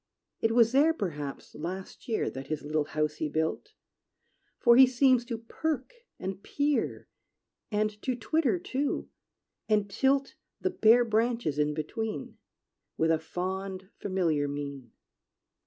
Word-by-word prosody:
It 225 0 +1
was 230 -1 +5
there, 300 +5 +4
perhaps, 150 - -5
last 185 +4 -6
year, 225 -3 0
That 135 +1 -7
his 155 0 -3
little 150 0 0
house 155 0 -1
he 155 - -2
built; 160 - -2 0.8
For 235 -2 +6
he 260 +1 +9
seems 255 -1 +4
to 235 -2 -3
perk 265 - -3 0.2
and 190 +1 -5
peer, 285 +4 -1 0.6
And 210 0 -1
to 255 - -1
twitter, 250 - +1
too, 270 +10 -2 0.6
and 210 -2 +3
tilt 270 +5 +2 0.3
The 375 - 0
bare 240 -3 +5
branches 225 - 0
in 150 0 +1
between, 160 - -4 0.6
With 160 0 +3
a 160 - +3
fond, 190 +3 -4
familiar 170 -7 0
mien. 140 -4 -6
205 Hz, 135 wpm, -29 LUFS, 155-245 Hz, 0.8 s, he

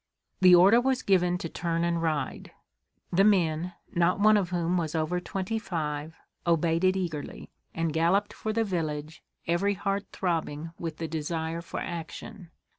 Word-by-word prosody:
The 185 -1 +8
order 195 +7 +7
was 260 0 0
given 180 -2 +3
to 170 - -4
turn 170 0 -2
and 170 -1 0
ride. 155 -5 -2 0.6
The 190 +3 +5
"men," 175 -4 +2 0.2
not 175 +2 +2
one 215 +1 +6
of 195 -4 +1
whom 175 0 0
was 165 -3 -1
over 160 +3 0
twenty 195 +4 -3
five, 160 -5 -4 0.3
obeyed 165 0 +2
it 185 +1 +3
eagerly, 160 -6 -5 0.2
and 165 -1 -1
galloped 175 +6 +2
for 220 - -3
the 225 +1 +1
village, 155 -5 -3 0.2
every 195 +4 +1
heart 200 +2 -2
throbbing 165 -3 -2
with 165 -2 -4
the 165 - -3
desire 160 +1 -3
for 170 - -6
action. 175 +3 -7
170 Hz, 160 wpm, -28 LUFS, 160-190 Hz, 0.6 s, The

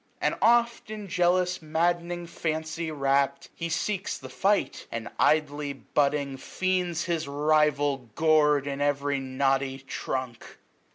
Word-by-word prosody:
And - - +1
oft, 235 -1 +3
in 215 -2 -6
jealous 180 0 +1
mad'ning 170 +2 0
fancy 160 0 -3
wrapt. 140 -1 0
He 170 0 -4
seeks 195 +3 -2
the - - -10
fight; 200 +1 0
and, 115 0 -4
idly 150 -2 +2
butting 140 +3 0
feigns 180 +2 -1
His 165 -4 -2
rival 145 -3 +1
gor'd 150 -3 +4
in 140 0 -3
ev'ry 145 -1 +1
knotty 135 0 0
trunk. 130 -2 -5
150 Hz, 120 wpm, -27 LUFS, 140-175 Hz, -, gor'd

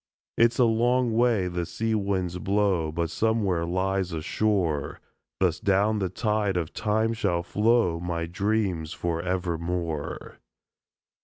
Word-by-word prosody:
It's 120 0 +3
a 125 - +5
long 120 +1 +2
way 115 -5 +2
the 90 -1 -2
sea 110 +6 -2
winds 95 -4 -1
blow 95 -5 +1
But 85 0 -2
somewhere 100 -7 0
lies 95 +1 -1
a 80 - -3
shore 90 -10 0 0.4
Thus 90 -3 +1
down 100 +2 +2
the 95 -2 -1
tide 105 -1 0
of 85 -3 -3
Time 110 +1 0
shall 100 -7 0
flow 105 -3 +2
My 85 -1 -2
dreams 95 -3 -1
forevermore. 85 -2 -3
95 Hz, 130 wpm, -26 LUFS, 85-110 Hz, 0.4 s, a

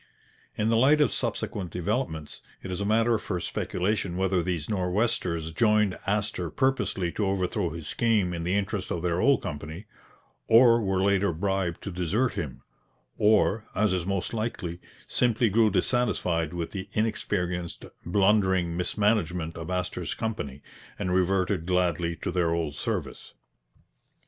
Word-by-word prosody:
In 105 +1 +1
the 115 - +3
light 140 +6 +5
of 145 -6 +4
subsequent 95 -4 -2
developments, 90 - -3 0.2
it 95 - -5
is 90 - -3
a - - -1
matter 115 +1 +3
for 90 -4 -3
speculation 90 +1 -2
whether 95 -1 +1
these 85 -3 -2
Nor'westers 90 -4 0
joined 105 0 +3
Astor 100 -4 -1
purposely 100 - 0
to 105 +2 -1
overthrow 95 -1 0
his 80 -1 -7
scheme 105 -2 +1
in 85 -1 -4
the 90 +3 0
interests 100 -1 -2
of 85 -1 -3
their 90 0 +1
old 140 -2 +4
company; 80 +5 -6 0.6
or 115 0 +6
were 95 -2 0
later 100 -1 +3
bribed 95 0 -1
to 100 - -4
desert 95 +8 0
him; 65 -4 -5 0.6
or, 110 0 +3
as 105 -2 +2
is 90 -1 -1
most 95 +1 -2
likely, 105 -6 -3 0.3
simply 120 -1 +2
grew 110 +2 +4
dissatisfied 90 -6 0
with 85 -2 -4
the 100 0 -6
inexperienced, 90 -5 -2 0.2
blundering 95 -2 +2
mismanagement 90 -3 0
of 80 +1 -6
Astor's 90 -3 -2
company, 75 - -4 0.3
and 90 -2 -1
reverted 95 -1 +1
gladly 85 -2 +1
to - - -1
their 90 -2 +1
old 80 -3 -1
service. - - -4
95 Hz, 145 wpm, -27 LUFS, 85-105 Hz, 0.6 s, or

